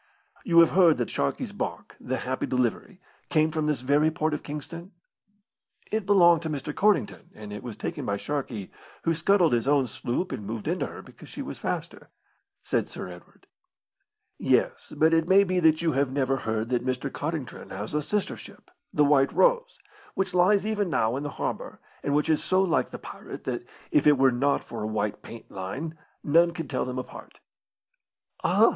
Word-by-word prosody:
"You 170 -2 +6
have 165 - +5
heard 175 -6 +5
that 120 - -2
Sharkey's 70 - -2
barque, - - -5
the 130 +1 -3
Happy 130 0 -3
Delivery, 125 - -1 0.3
came 155 -1 +3
from 155 -1 -1
this 150 -4 0
very 145 +4 +3
port 155 0 -1
of 150 - -2
Kingston?" 165 +6 -8 1.0
"It 220 -3 -1
belonged 175 -5 +6
to 160 - -4
Mr. 150 0 -4
Codrington, 210 +3 +1
and 105 -1 -9
it 105 - -6
was 120 -4 -7
taken - - -4
by 100 - -1
Sharkey, 120 -6 -4 0.3
who 165 - +2
scuttled 170 -1 +3
his 120 +1 +1
own 140 -2 +4
sloop 125 - -3
and - - -4
moved 110 +1 -5
into - - 0
her - - -10
because - - -14
she - - -6
was - - -7
faster," - - -4 0.5
said - - -1
Sir - - -7
Edward. 90 0 -14 0.9
"Yes; - - +1
but 160 +1 +4
it 165 0 +3
may 195 +1 +7
be 185 -1 0
that 160 -1 +4
you 165 - +2
have 135 -1 +1
lever 135 -1 +1
heard 110 -2 -2
that 125 -1 0
Mr. 130 +1 -2
Codrington 150 -3 -5
has 105 +6 -6
a 150 - +1
sister 205 +7 -1
ship, - - -14 0.2
the 150 - +3
White 140 -1 +4
Rose, - - +2 0.4
which 190 -1 -1
lies 190 +3 +4
even 210 -3 0
now 115 -6 +1
in 135 - -3
the 145 - -3
harbour, - - -4 0.2
and 140 - 0
which 150 +1 +2
is 155 -1 +2
so 185 - +2
like 165 -9 +1
the - - -7
pirate, - - -9
that, - - -4 0.2
if 150 - +3
it 145 -1 +6
were 135 0 +5
not 135 +3 +1
for 115 - -7
a 105 - -2
white 105 -1 -2
paint 115 - -11
line, 130 +13 -5 0.3
none 170 +3 +4
could 160 -6 -5
tell - - 0
them 125 0 -4
apart." 130 - -8 1.0
"Ah! - - +5
150 Hz, 195 wpm, -27 LUFS, 125-170 Hz, 1.0 s, may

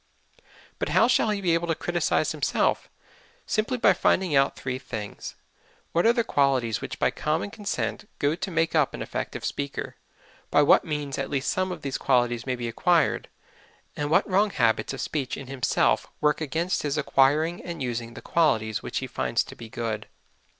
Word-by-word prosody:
But - - -1
how 230 - +6
shall 245 -3 +3
he 210 -1 -1
be 175 -3 +2
able 170 +1 0
to 165 - +1
criticise 175 +1 0
himself? - - 0 0.6
Simply 230 +4 0
by 210 -5 +5
finding 180 -3 +2
out 135 0 +3
three 130 -1 -4
things: 110 -5 -7 0.6
What 170 +6 +3
are - - +7
the 235 -1 +1
qualities 135 - +1
which - - -5
by - - +2
common 160 +6 -2
consent 210 +1 -3
go 145 +1 +1
to 180 +4 -4
make 165 -2 0
up 155 -4 +2
an - - -4
effective - - -5
speaker; 140 -1 -4 0.5
by 145 - +5
what - - +5
means 150 -3 -3
at 135 - -2
least 140 -1 -1
some 185 0 -1
of 170 -4 -7
these 135 -2 -3
qualities 120 -1 +1
may 130 - 0
be 120 -1 -4
acquired; 165 +6 +2 0.7
and 145 0 -2
what 160 - +3
wrong 200 +2 +3
habits 115 - +1
of - - -5
speech 140 -4 -3
in 135 - -7
himself 130 -1 +1
work 150 +1 +2
against 165 +5 -1
his 145 0 -1
acquiring 150 +4 +2
and 170 -5 -5
using 115 -1 -4
the - - -10
qualities 110 -11 +1
which - - -4
he - - -1
finds - - 0
to - - -11
be 115 - -10
good. 110 -2 -4
145 Hz, 185 wpm, -26 LUFS, 130-175 Hz, 0.7 s, are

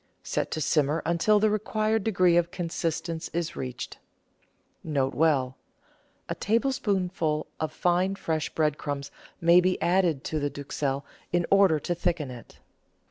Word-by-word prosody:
Set - - -2
to - - -3
simmer 150 +1 +1
until 175 +5 +3
the 215 0 +3
required 215 0 0
degree 185 -5 +3
of 170 0 +3
consistence 165 -2 -3
is 170 -1 -2
reached. 125 -1 -6 0.8
]Sj_B. 140 -2 +1 0.4
— - - -38
A - - 0
tablespoonful 195 - 0
of 155 -1 -2
fine, 180 +4 +1
fresh 160 -5 -2
bread 150 -2 0
crumbs 140 -1 -4 0.3
may 170 +1 +6
be 185 0 +1
added 175 -6 +2
to 155 - -2
the 145 0 -1
duxelle 140 -1 -3 0.3
in 175 -1 +2
order 195 -6 +5
to 175 - -2
thicken 170 -5 -1
it. 120 -2 -12
170 Hz, 140 wpm, -27 LUFS, 150-185 Hz, 0.8 s, may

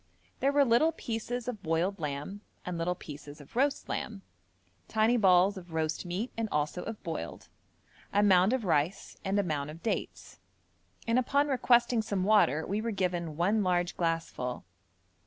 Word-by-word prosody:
There 275 - +2
were 285 0 +4
little 245 +7 +4
pieces 240 -2 -4
of 240 -5 -4
boiled 170 +5 0
lamb, 150 +7 -4 0.2
and 180 - -3
little 170 +2 -1
pieces 145 -3 -10
of 145 - -15
roast 275 +3 +1
lamb; 200 -3 -4 0.6
tiny 220 +2 +3
balls 190 -2 +4
of 175 -3 -10
roast 160 +2 -1
meat 195 +8 -3
and 225 -1 -2
also 150 +4 -1
of 225 +1 -7
boiled; 125 - -5 0.6
a 205 - +3
mound 190 0 +5
of 260 -2 0
rice 160 +2 0
and 195 +1 +1
a - - +2
mound 150 -5 -2
of 160 +2 -10
dates; 225 - -4 0.7
and 230 +2 +3
upon 280 +3 +2
requesting 240 -2 +3
some 200 -3 -2
water 185 -8 +4
we 205 +3 -1
were 230 - -2
given 175 -6 -2
one 200 +6 +2
large 180 -2 +1
glassful. 165 -7 -2
195 Hz, 165 wpm, -30 LUFS, 165-230 Hz, 0.7 s, mound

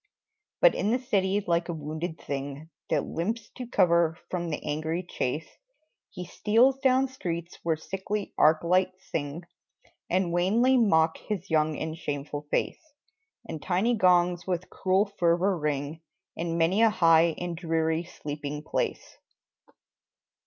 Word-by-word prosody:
But - - +7
in 205 - -1
the 240 - +3
city, 205 -6 0
like 170 0 0
a - - -1
wounded 160 +2 -5
thing 140 +3 -6 0.2
That 150 -3 +1
limps 210 +6 -3
to 250 -2 -8
cover 170 -7 +3
from 175 -2 -2
the 150 - -3
angry 160 +4 -2
chase, 150 0 -2 0.6
He 180 -1 -7
steals 235 +9 +3
down 265 0 +3
streets 170 -9 -5
where 165 -1 +1
sickly 195 +5 -4
arc 155 +1 +4
lights 185 +2 +1
sing, 150 +2 -3 0.7
And 180 -1 +1
wanly 220 +9 +3
mock 165 -9 +3
his 195 -4 -5
young 155 -1 +2
and 160 0 -4
shameful 145 -1 -5
face; - - -1 0.7
And 155 - -6
tiny 190 +8 +1
gongs 180 -3 +3
with 180 -1 -3
cruel 190 +2 +2
fervor 175 +3 +3
ring 150 0 -3 0.3
In 165 0 -2
many 170 +6 +2
a 225 - +6
high 165 -5 +4
and 175 -1 -4
dreary 160 -1 0
sleeping 150 -2 -6
place. - - -3
170 Hz, 140 wpm, -27 LUFS, 160-195 Hz, 0.7 s, But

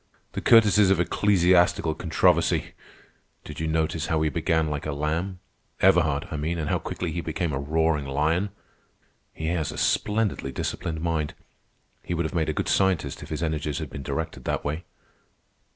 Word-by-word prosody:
"'The - - -4
courtesies 105 -3 +6
of 95 -3 +3
ecclesiastical 90 -2 +3
controversy!' - - +1 0.7
Did 75 - -9
you 80 - -1
notice 80 0 0
how 80 - +1
he 80 - +1
began 80 -1 +1
like 75 0 -3
a 75 - -2
lamb—Everhard, 85 0 0
I 80 - -3
mean, 80 +4 -2
and 75 -2 -2
how - - +1
quickly 90 -3 -4
he 85 - -3
became 80 -1 -2
a 65 - -1
roaring 75 0 0
lion? 80 +8 +1 0.8
He 80 - -6
has 85 -3 -1
a - - -8
splendidly 105 -10 0
disciplined 80 +4 -3
mind. 80 -3 -1 0.7
He 85 - -3
would 85 0 -1
have 80 - -4
made 80 -3 0
a 80 - -3
good - - -1
scientist 90 -8 +1
if - - -9
his 80 +1 -3
energies 75 -2 -2
had - - -5
been 70 - -6
directed 70 +3 -4
that - - -2
way." 75 +4 -3
80 Hz, 170 wpm, -25 LUFS, 75-90 Hz, 0.8 s, courtesies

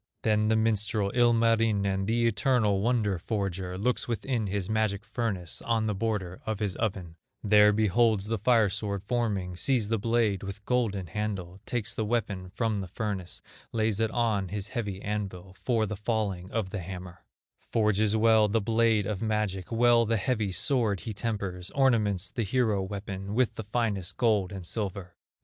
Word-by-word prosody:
Then 110 -1 +2
the 110 - +3
minstrel, 105 -2 +1
Ilmarinen, 115 -5 +2
The 115 +1 +2
eternal 110 -2 +2
wonder 105 -5 +1
forger, 95 -2 -3
Looks 120 +6 0
within 115 -1 -1
his 100 -1 -2
magic 110 -2 0
furnace, 100 -8 -3
On 115 -2 0
the 105 - 0
border 95 -4 -2
of 110 -1 -2
his 100 -3 -2
oven, 95 -7 -3 0.3
There 105 0 +6
beholds 110 0 +2
the 110 0 -2
fire 110 -2 +3
sword 100 -2 -3
forming, 100 -6 -1
Sees 115 +2 +1
the 115 -1 +1
blade 115 -3 +1
with 100 +1 -7
golden 110 -7 0
handle; 95 -1 -4
Takes 115 -2 -2
the 110 - -2
weapon 105 -5 -2
from 110 +2 -1
the 95 -2 -4
furnace, 95 -2 -4 0.3
Lays 110 -2 +1
it 110 -1 +2
on 110 -5 0
his 100 +2 -4
heavy 100 -5 -3
anvil 95 -3 -4
For 115 -3 +1
the 105 - -4
falling 105 -4 -2
of 110 -4 -2
the 100 - -3
hammer; 90 0 -8 0.5
Forges 110 -1 +2
well 110 -1 +5
the 110 +2 +1
blade 110 -1 +2
of 100 -2 -3
magic, 105 -4 -1
Well 115 0 +4
the 115 0 +2
heavy 105 -1 0
sword 110 - +1
he 110 - -5
tempers, 100 -4 -3
Ornaments 105 -8 +2
the 120 - -2
hero 110 -1 +1
weapon 100 0 -5
With 125 -1 +2
the 110 - -7
finest 100 -5 -2
gold 105 -7 +2
and 95 -3 -7
silver. 95 -2 -4
105 Hz, 165 wpm, -28 LUFS, 95-115 Hz, 0.5 s, There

